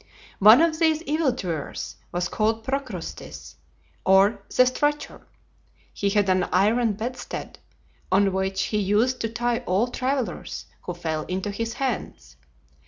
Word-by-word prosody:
One 215 Hz, +8 st, +8 dB
of 320 Hz, -1 st, +1 dB
these 320 Hz, -1 st, +2 dB
evil 305 Hz, -2 st, +1 dB
doers 170 Hz, -, -5 dB
was 175 Hz, 0 st, -1 dB
called 220 Hz, +3 st, 0 dB
Procrustes, 260 Hz, -9 st, -5 dB, 0.5 s
or 195 Hz, +3 st, +4 dB
the 255 Hz, -, +4 dB
Stretcher. 290 Hz, +3 st, -1 dB, 0.7 s
He 200 Hz, -, 0 dB
had 205 Hz, 0 st, +2 dB
an 185 Hz, -1 st, +2 dB
iron 215 Hz, +5 st, +2 dB
bedstead, 245 Hz, +4 st, -6 dB, 0.5 s
on 195 Hz, 0 st, +3 dB
which 190 Hz, 0 st, -1 dB
he 210 Hz, -, -1 dB
used 210 Hz, +6 st, +1 dB
to 225 Hz, -, -1 dB
tie 240 Hz, +1 st, -1 dB
all 200 Hz, +7 st, +2 dB
travellers 255 Hz, -5 st, -3 dB, 0.2 s
who 180 Hz, -, -6 dB
fell 160 Hz, -3 st, -2 dB
into 190 Hz, +3 st, -2 dB
his 230 Hz, +3 st, -3 dB
hands. 65 Hz, -, -4 dB
215 Hz, 135 wpm, -24 LUFS, 190-255 Hz, 0.7 s, One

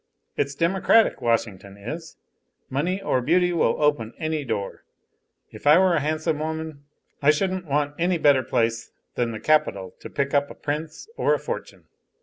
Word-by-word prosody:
It's 140 Hz, 0 st, -1 dB
democratic, 190 Hz, +7 st, +3 dB
Washington 105 Hz, -4 st, -1 dB
is. 155 Hz, +11 st, -7 dB, 0.5 s
Money 170 Hz, +8 st, 0 dB
or 130 Hz, -9 st, +1 dB
beauty 175 Hz, +6 st, +2 dB
will 170 Hz, -, +1 dB
open 145 Hz, -7 st, +1 dB
any 155 Hz, -2 st, -2 dB
door. 110 Hz, -6 st, -4 dB, 0.7 s
If -, -, -7 dB
I 150 Hz, +2 st, +8 dB
were 185 Hz, -1 st, +4 dB
a 165 Hz, -, +3 dB
handsome 155 Hz, +1 st, -1 dB
woman, 160 Hz, -2 st, -5 dB, 0.4 s
I 140 Hz, -, +4 dB
shouldn't 185 Hz, +3 st, +1 dB
want 145 Hz, 0 st, 0 dB
any 175 Hz, +1 st, +2 dB
better 145 Hz, -4 st, +4 dB
place 115 Hz, -1 st, -1 dB, 0.2 s
than 120 Hz, -1 st, -1 dB
the 110 Hz, -2 st, -5 dB
capital 105 Hz, -13 st, +1 dB
to -, -, -9 dB
pick 140 Hz, -1 st, -2 dB
up 145 Hz, 0 st, +2 dB
a -, -, -10 dB
prince 155 Hz, -, -5 dB
or -, -, +3 dB
a -, -, -4 dB
fortune." -, -, -6 dB
150 Hz, 165 wpm, -24 LUFS, 125-160 Hz, 0.7 s, I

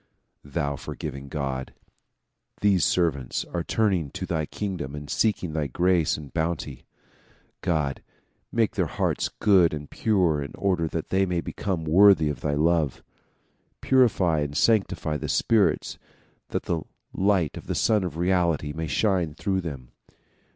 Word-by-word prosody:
thou 70 Hz, 0 st, -2 dB
forgiving 70 Hz, 0 st, -7 dB
God! 70 Hz, -3 st, -4 dB, 0.9 s
These 100 Hz, -3 st, +3 dB
servants 75 Hz, -8 st, 0 dB
are 85 Hz, -1 st, -1 dB
turning 95 Hz, -9 st, +1 dB
to -, -, -5 dB
thy 80 Hz, -3 st, -2 dB
king 100 Hz, -3 st, -4 dB
dom 70 Hz, -2 st, -5 dB
and 75 Hz, 0 st, -7 dB
seeking 95 Hz, -3 st, 0 dB
thy 75 Hz, -2 st, -1 dB
grace 85 Hz, +4 st, +2 dB
and 75 Hz, -4 st, -10 dB
bounty. 80 Hz, -5 st, -3 dB, 0.7 s
God! 75 Hz, -6 st, -1 dB, 0.5 s
make 115 Hz, -1 st, +1 dB
their 95 Hz, -6 st, 0 dB
hearts -, -, -1 dB
good 90 Hz, -6 st, +3 dB
and 75 Hz, -1 st, -9 dB
pure 90 Hz, -9 st, +1 dB
in 70 Hz, -, -6 dB
order 90 Hz, -5 st, 0 dB
that 80 Hz, 0 st, -4 dB
they 95 Hz, 0 st, +2 dB
may 90 Hz, -1 st, 0 dB
become 85 Hz, +2 st, -3 dB
worthy 85 Hz, -1 st, +6 dB
of 75 Hz, -, -5 dB
thy 70 Hz, -1 st, 0 dB
love. 80 Hz, -2 st, +1 dB, 0.8 s
Purify 105 Hz, -, +3 dB
and 75 Hz, 0 st, -2 dB
sanctify 95 Hz, -9 st, +1 dB
the -, -, -5 dB
spirits 110 Hz, -3 st, +1 dB, 0.5 s
that -, -, -3 dB
the 85 Hz, -2 st, -1 dB, 0.3 s
light 95 Hz, -5 st, +1 dB
of -, -, -9 dB
the -, -, -2 dB
Sun 110 Hz, -3 st, +2 dB
of 85 Hz, -3 st, -4 dB
Reality 85 Hz, -4 st, +1 dB
may 80 Hz, 0 st, -4 dB
shine 85 Hz, 0 st, +1 dB
through 95 Hz, +2 st, -1 dB
them. 70 Hz, -8 st, -7 dB
85 Hz, 150 wpm, -25 LUFS, 75-95 Hz, 0.9 s, worthy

